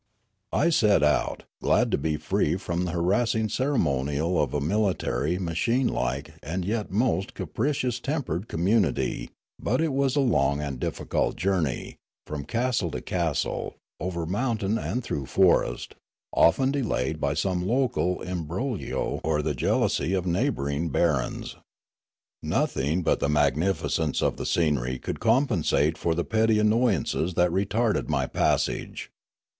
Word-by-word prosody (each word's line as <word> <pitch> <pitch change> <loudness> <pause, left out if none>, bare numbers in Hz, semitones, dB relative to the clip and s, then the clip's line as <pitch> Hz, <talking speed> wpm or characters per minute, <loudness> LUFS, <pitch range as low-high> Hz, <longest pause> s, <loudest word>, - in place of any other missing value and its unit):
I 170 - +2
set 105 - +4
out, 75 0 +1 0.2
glad - - +2
to - - +2
be 75 +1 -1
free 75 - 0
from 90 -1 -2
the 90 - -2
harassing 110 +6 +1
cere 140 +5 0
monial 75 - +1
of 70 -4 -1
a 75 - 0
military, 90 +2 0
machine 115 +9 0
like, 65 +5 -2
and 90 +4 -3
yet 105 +1 -2
most 100 -1 0
capricious 125 - -1
tempered 120 - -3
community; 95 +2 0 0.3
but - - 0
it 160 -3 +1
was 135 0 +1
a - - +3
long 70 - +2
and 70 -4 -4
difficult - - -1
journey, 90 -8 -1 0.3
from 75 -2 -5
castle 120 -3 0
to - - -4
castle, 85 -5 -2 0.2
over 85 -1 -3
mountain 110 +2 -1
and 125 +1 -2
through 70 - -4
forest, 90 -8 +2 0.4
often 130 +10 +4
delayed 80 - -1
by 70 0 0
some 90 +1 -1
local 120 -7 0
imbroglio 90 - -3
or 75 -1 0
the 75 - 0
jealousy 70 +6 +1
of 95 -1 -1
neighbouring 85 - 0
barons. 75 -4 0 0.8
Nothing 75 +7 0
but - - +2
the 70 - 0
magnificence 75 +1 +1
of - - +1
the - - -4
scenery 70 -6 +1
could - - -5
compensate 110 - +2
for 80 +1 -1
the 85 - -1
petty 110 0 +2
annoyances 105 - +1
that 90 0 +3
retarded 100 +4 0
my 70 -4 +1
passage. - - -1
90 Hz, 140 wpm, -26 LUFS, 75-110 Hz, 0.8 s, set